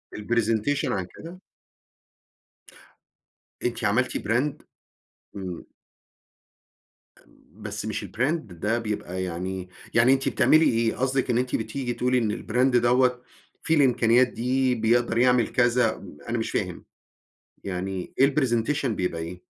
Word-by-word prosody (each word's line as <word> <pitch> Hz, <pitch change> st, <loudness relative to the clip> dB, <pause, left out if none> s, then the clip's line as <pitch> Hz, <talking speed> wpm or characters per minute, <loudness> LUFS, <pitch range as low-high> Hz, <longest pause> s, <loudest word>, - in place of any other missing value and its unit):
الpresentation 115 Hz, +4 st, 0 dB
عن 95 Hz, -2 st, -2 dB
كده؟ 175 Hz, +3 st, -11 dB, 2.2 s
أنتِ 120 Hz, -1 st, -2 dB
عملتِ 120 Hz, +5 st, +1 dB
brand؟! 120 Hz, +7 st, -1 dB, 0.7 s
إمم. 95 Hz, -3 st, -6 dB, 2.0 s
بس 105 Hz, 0 st, -5 dB
مش 105 Hz, -1 st, -3 dB
الbrand 130 Hz, -, 0 dB
ده 105 Hz, -, -3 dB
بيبقى 100 Hz, -5 st, -4 dB
يعني 90 Hz, +1 st, -4 dB, 0.2 s
يعني 120 Hz, +3 st, +5 dB
أنتِ 135 Hz, 0 st, 0 dB
بتعملي 160 Hz, +1 st, +4 dB
إيه؟ 115 Hz, -3 st, +1 dB
قصدِك 130 Hz, +1 st, 0 dB
إن 120 Hz, -, +2 dB
أنتِ 125 Hz, +1 st, 0 dB
بتيجي 120 Hz, +2 st, -3 dB
تقولي 125 Hz, +1 st, +1 dB
إن 110 Hz, -4 st, +1 dB
الbrand 125 Hz, +2 st, +2 dB
دوّة 125 Hz, +1 st, +3 dB, 0.4 s
فيه 160 Hz, -, +2 dB
الإمكانيات 125 Hz, -3 st, +4 dB
دي 125 Hz, +2 st, 0 dB
بيقدر 115 Hz, +1 st, +1 dB
يعمل 125 Hz, 0 st, +4 dB
كذا 120 Hz, -1 st, +2 dB
م 90 Hz, -6 st, -12 dB
أنا -, -, 0 dB
مش -, -, -3 dB
فاهم، -, -, -3 dB, 0.8 s
يعني 95 Hz, -1 st, -4 dB
إيه 135 Hz, +1 st, +4 dB
الpresentation 135 Hz, +1 st, +1 dB
بيبقى 90 Hz, -6 st, -2 dB
إيه؟ 90 Hz, +2 st, -8 dB
120 Hz, 125 wpm, -25 LUFS, 105-130 Hz, 2.2 s, يعني